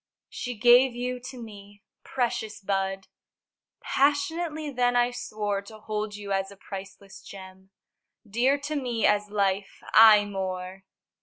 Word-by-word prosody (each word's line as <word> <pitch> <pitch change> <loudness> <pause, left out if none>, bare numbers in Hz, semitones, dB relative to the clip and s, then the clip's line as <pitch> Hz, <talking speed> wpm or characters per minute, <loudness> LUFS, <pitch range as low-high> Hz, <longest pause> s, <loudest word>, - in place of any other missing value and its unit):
She 245 0 -5
gave 245 +2 +6
you 250 +1 -3
to 260 - -10
me. 205 -3 -12 0.2
Precious 220 -4 -2
bud! 195 -1 -2 0.8
Passionately 300 +2 0
then 245 -1 +1
I 245 0 +3
swore 210 -4 -3
To 215 +2 -13
hold 215 -1 -4
you 205 -1 -7
as 195 0 0
a 200 - -14
priceless 195 0 -10
gem, 190 -1 -12 0.6
Dear 245 +7 +2
to 295 +2 -4
me 245 -5 -1
as 210 0 +2
life 200 -1 -1
aye 215 -2 +8
more! 190 -1 -5
210 Hz, 135 wpm, -26 LUFS, 195-245 Hz, 0.8 s, aye